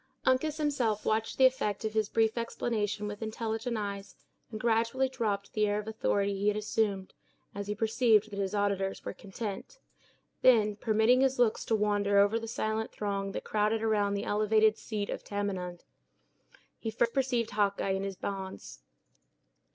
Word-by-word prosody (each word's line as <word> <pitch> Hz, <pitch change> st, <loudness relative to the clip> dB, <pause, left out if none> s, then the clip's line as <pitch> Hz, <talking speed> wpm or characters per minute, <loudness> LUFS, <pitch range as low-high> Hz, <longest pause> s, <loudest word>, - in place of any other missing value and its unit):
Uncas 290 Hz, +4 st, +2 dB
himself 255 Hz, -9 st, 0 dB
watched 220 Hz, +1 st, 0 dB
the 265 Hz, -, +6 dB
effect 220 Hz, -5 st, +1 dB
of 215 Hz, -, -2 dB
his 215 Hz, -2 st, +1 dB
brief 225 Hz, 0 st, +2 dB
explanation 215 Hz, -3 st, -2 dB
with 205 Hz, +1 st, -6 dB
intelligent 225 Hz, +1 st, -3 dB
eyes, 200 Hz, -1 st, -5 dB, 0.3 s
and 215 Hz, -, -6 dB
gradually 230 Hz, +3 st, +1 dB
dropped 215 Hz, -6 st, -2 dB
the 215 Hz, -1 st, +2 dB
air 205 Hz, 0 st, 0 dB
of 210 Hz, 0 st, -5 dB
authority 200 Hz, -2 st, 0 dB
he 200 Hz, +1 st, -1 dB
had 210 Hz, 0 st, +2 dB
assumed, 210 Hz, -2 st, -1 dB, 0.4 s
as 200 Hz, 0 st, -5 dB
he 210 Hz, -, -2 dB
perceived 220 Hz, -1 st, +3 dB
that 200 Hz, -, -5 dB
his 195 Hz, +1 st, -1 dB
auditors 200 Hz, -1 st, -1 dB
were -, -, -4 dB
content. 200 Hz, -, -7 dB, 0.6 s
Then, 215 Hz, -5 st, +5 dB
permitting 220 Hz, +4 st, +3 dB
his 270 Hz, 0 st, +2 dB
looks 240 Hz, -3 st, +2 dB
to 225 Hz, -, +2 dB
wander 205 Hz, -1 st, +2 dB
over 205 Hz, +3 st, +4 dB
the 225 Hz, -, -7 dB
silent 220 Hz, -1 st, -2 dB
throng 200 Hz, -1 st, -3 dB
that -, -, -4 dB
crowded 215 Hz, +1 st, 0 dB
around 205 Hz, -2 st, +1 dB
the 200 Hz, -, -3 dB
elevated 215 Hz, +1 st, +3 dB
seat 210 Hz, -2 st, -4 dB
of -, -, -5 dB
Tamenund, 190 Hz, -4 st, -4 dB, 1.0 s
he 225 Hz, -, -3 dB
first 235 Hz, +1 st, 0 dB
perceived 250 Hz, -4 st, 0 dB
Hawkeye 200 Hz, -2 st, +1 dB
in 190 Hz, 0 st, 0 dB
his 195 Hz, -1 st, -4 dB
bonds. 190 Hz, 0 st, -6 dB
215 Hz, 165 wpm, -30 LUFS, 200-225 Hz, 1.0 s, the